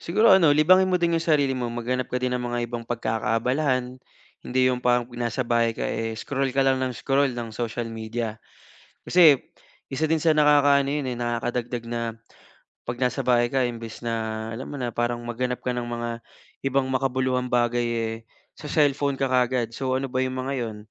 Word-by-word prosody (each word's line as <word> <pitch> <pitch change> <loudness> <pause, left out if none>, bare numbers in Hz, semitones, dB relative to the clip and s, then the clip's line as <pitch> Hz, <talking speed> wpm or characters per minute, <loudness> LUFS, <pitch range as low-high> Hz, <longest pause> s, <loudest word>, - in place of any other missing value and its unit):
Siguro 215 +7 +3
ano 165 -6 +5
libangin 185 +5 +5
mo 180 - +2
din 170 -1 +2
yung 165 - -2
sarili 145 -5 +2
mo. 125 - -2
Maghanap 125 +2 -2
ka 125 - 0
din 125 0 0
ng 125 - -4
mga 120 0 -2
ibang 120 0 -5
pagkakaabalahan. 125 +3 -1 0.5
Hindi 130 +1 0
yung 125 -1 0
parang 120 0 +2
nasa 120 +2 -2
bahay 115 -1 +1
ka, - - -6
eh, 115 0 -2
scroll 135 +4 -2
ka 135 - +1
lang 135 -1 +2
ng 130 - -2
scroll 135 +2 +1
ng 120 -1 -5
social 120 0 -3
media, 115 0 -4 0.7
kasi 165 -6 +7 0.5
isa 135 +4 -2
din 160 - +3
sa 155 0 +3
nakakaano 145 -2 +4
yun 145 -2 -2
nakakadagdag 120 0 -3
na 120 0 -3 0.8
pag 120 0 -5
nasa 125 -1 0
bahay 120 -1 +3
ka 135 0 +1
imbes 115 -2 -5
na 110 -1 -3
alam 115 +4 -6
mo - - -7
na 125 -3 -3
parang 120 0 -2
maghanap 125 +1 -3
ka 125 - -1
ng 120 -1 -3
mga 120 0 -4 0.5
ibang 135 0 +2
makabuluhang 130 -1 0
bagay, 120 0 +1
eh, 115 -1 -2 0.4
sa 150 - -8
cellphone 145 -2 +2
ka 135 -1 -1
kagad. 125 -2 +1
So 130 +1 -2
ano 135 -1 -3
ba 130 0 0
yung 130 0 -3
mga 135 +2 -3
yun? 110 -2 -4
125 Hz, 190 wpm, -25 LUFS, 120-135 Hz, 0.8 s, kasi